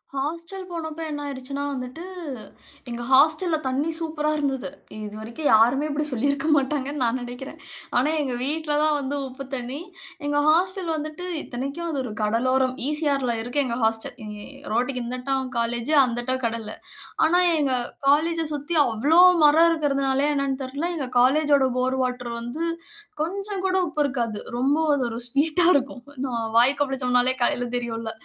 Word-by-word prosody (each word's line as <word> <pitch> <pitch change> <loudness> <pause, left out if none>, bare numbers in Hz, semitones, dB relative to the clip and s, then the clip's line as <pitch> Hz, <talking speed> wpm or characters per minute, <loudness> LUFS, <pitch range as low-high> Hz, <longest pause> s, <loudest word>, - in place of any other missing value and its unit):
Hostel 335 +7 -3
போனப்ப 320 -1 -5
என்ன 290 -1 -4
ஆயிருச்சுன்னா, 275 0 -5
வந்துட்டு 255 +6 -6 0.9
எங்க 240 0 -5
ஹாஸ்டல்ல 315 +5 +5
தண்ணீ 280 +5 0
சூப்பரா 310 -2 -1
இருந்தது. 270 -3 -1 0.4
இதுவரைக்கும் 220 +8 -5
யாருமே 245 +7 +5
இப்படி 295 +1 -1
சொல்லிருக்க 280 +4 0
மாட்டாங்கன்னு 280 0 -1
நான் 240 +2 +1
நினைக்கிறேன். 245 +2 -8 0.4
ஆனா, 260 +5 +3
எங்க 265 -4 -2
வீட்ல 300 +3 -1
தான் 310 -1 +3
வந்து 280 +1 -3
உப்பு 265 +1 -8
தண்ணீ. 255 +3 -4 0.5
எங்க 290 0 +1
ஹாஸ்டல் 365 +1 +2
வந்துட்டு 310 +3 -5 0.2
இத்தனைக்கும், 275 +7 -5
அது 280 - -2
ஒரு 245 - -5
கடலோரம். 255 +4 +1
இசிஆர்ல 280 -5 0
இருக்கு, 245 +5 -2
எங்க 235 -1 -2
ஹாஸ்டல். 225 +4 0
இ - - -7 0.5
ரோட்க்கு 250 +2 0
இந்தட்டம் 255 +2 -2
காலேஜூ 235 +5 0
அந்தட்டம் 250 +1 -1
கடலு. 225 -2 -3 0.5
ஆனா, 350 +3 +4 0.2
எங்க 280 -3 +1 0.4
காலேஜ 330 +3 +3
சுத்தி 295 +3 -2
அவ்ளோ 295 +11 +4 0.2
மரம் 320 +3 +6
இருக்கதனாலயா, 275 -2 +1
என்னன்னு 275 -1 -1
தெரியல. 285 +7 -3
எங்க 270 -4 -3
காலேஜோட 280 +1 +4
போர் 260 +1 0
வாட்டர் 250 -1 -3
வந்து 240 +8 -4 0.6
கொஞ்சம் 390 +3 -4
கூட 375 - 0
உப்பு 300 - -2
இருக்காது. 235 -6 -2 0.2
ரொம்ப 275 +4 +2 0.2
அது 275 - +1
ஒரு 230 - -5
ஸ்வீட்டா 315 +6 +2
இருக்கும். 270 -2 -1 0.2
நாம 235 -3 -2
வாய் 260 +4 +5
கொப்பளிச்சோம்னாலே, 255 -2 +2
காலைல 245 0 +1
தெரியும்ல. 230 -2 -4
275 Hz, 145 wpm, -24 LUFS, 250-305 Hz, 0.9 s, மரம்